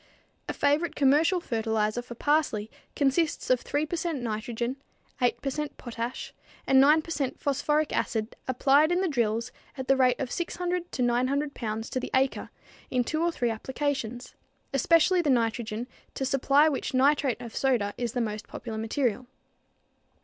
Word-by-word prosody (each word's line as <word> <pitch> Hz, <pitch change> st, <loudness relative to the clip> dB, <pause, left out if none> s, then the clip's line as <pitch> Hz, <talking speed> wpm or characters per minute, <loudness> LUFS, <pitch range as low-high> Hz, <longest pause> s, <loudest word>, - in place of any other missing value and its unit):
A -, -, -1 dB
favorite 295 Hz, +4 st, +1 dB
commercial 295 Hz, +6 st, +4 dB
fertilizer 220 Hz, -4 st, -1 dB
for 245 Hz, -1 st, -10 dB
parsley 260 Hz, -7 st, 0 dB, 0.2 s
consists 290 Hz, +1 st, +1 dB
of 255 Hz, -, +3 dB
3 290 Hz, +2 st, -1 dB
per 325 Hz, -, -3 dB
cent 330 Hz, -3 st, -2 dB
nitrogen, 235 Hz, +3 st, -3 dB, 0.4 s
8 245 Hz, -1 st, +2 dB
per 275 Hz, -, -1 dB
cent 300 Hz, +1 st, -4 dB
potash 235 Hz, 0 st, -5 dB, 0.3 s
and 265 Hz, 0 st, +6 dB
9 305 Hz, +3 st, +5 dB
per 330 Hz, -, -9 dB
cent 280 Hz, -5 st, -2 dB
phosphoric 295 Hz, +2 st, 0 dB
acid 220 Hz, 0 st, -1 dB
applied 275 Hz, +5 st, +4 dB
in 355 Hz, +1 st, +2 dB
the 380 Hz, -, +1 dB
drills 235 Hz, -4 st, 0 dB, 0.3 s
at 260 Hz, -1 st, -5 dB
the 270 Hz, -, +5 dB
rate 255 Hz, -2 st, +3 dB
of 260 Hz, -3 st, -3 dB
600 355 Hz, 0 st, -3 dB
to 250 Hz, -, -1 dB
900 260 Hz, +4 st, +1 dB
pounds 220 Hz, 0 st, -4 dB
to 255 Hz, -, -1 dB
the -, -, -5 dB
acre 265 Hz, 0 st, +1 dB, 0.4 s
in 250 Hz, -1 st, +1 dB
two 310 Hz, +6 st, -2 dB
or 340 Hz, 0 st, +2 dB
three 240 Hz, -7 st, -1 dB
applications 250 Hz, 0 st, -3 dB, 0.4 s
especially 335 Hz, +6 st, +4 dB
the 305 Hz, -, -1 dB
nitrogen, 230 Hz, -2 st, 0 dB, 0.3 s
to 270 Hz, -, -2 dB
supply 275 Hz, +3 st, +4 dB
which 275 Hz, -3 st, -2 dB
nitrate 275 Hz, -1 st, +3 dB
of 235 Hz, -2 st, -9 dB
soda 235 Hz, -7 st, +1 dB
is 240 Hz, -2 st, -3 dB
the 245 Hz, -, 0 dB
most 215 Hz, -1 st, -4 dB
popular 220 Hz, -2 st, -6 dB
material. 245 Hz, +1 st, -1 dB
260 Hz, 165 wpm, -27 LUFS, 235-295 Hz, 0.4 s, and